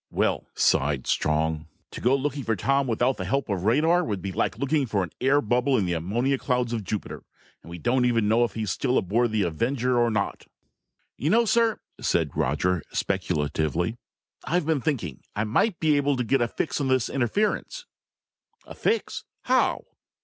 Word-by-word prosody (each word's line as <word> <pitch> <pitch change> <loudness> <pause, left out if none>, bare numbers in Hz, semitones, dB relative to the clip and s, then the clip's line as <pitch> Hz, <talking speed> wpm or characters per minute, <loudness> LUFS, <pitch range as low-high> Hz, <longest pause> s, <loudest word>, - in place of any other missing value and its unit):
"Well," - - 0
sighed 70 -1 +2
Strong, 80 0 0 0.2
"to - - -8
go 125 +3 +3
looking 140 +1 -2
for 115 -1 0
Tom 135 +7 +1
without 120 +3 +1
the - - -4
help 135 -2 -1
of 95 -2 -2
radar 160 +10 +3
would 105 - -2
be 95 +1 -5
like - - -1
looking 140 0 0
for 100 -4 0
an 85 - -6
air 135 +3 +4
bubble 125 +4 +1
in 100 - +1
the 90 - -1
ammonia 120 +11 0
clouds 125 -2 0
of 110 -3 -2
Jupiter. 100 +2 -5 0.4
And - - -14
we 85 - -7
don't 125 +7 +1
even 115 -3 +2
know 115 +3 +4
if 120 - -2
he's 110 -4 -2
still 125 +7 0
aboard 115 +5 +1
the 110 -2 +1
Avenger 120 - 0
or 120 0 +3
not!" 105 -3 -2 0.7
"You 145 - -1
know, 235 +5 +4
sir," 230 0 +2 0.2
said - - 0
Roger 80 +6 0
speculatively, 80 +8 -1 0.4
"I've 175 -1 0
been 155 -3 +1
thinking. 110 - -2
I 105 - 0
might 165 - +1
be 155 -2 +3
able 145 0 +1
to 125 - 0
get 135 +2 +1
a 120 - +2
fix 140 +4 -2
on 135 - 0
this 130 -2 +2
interference." 210 - -1 0.8
"A - - -10
fix? 455 +1 -1 0.2
How?" - - +2
120 Hz, 185 wpm, -25 LUFS, 100-140 Hz, 0.8 s, air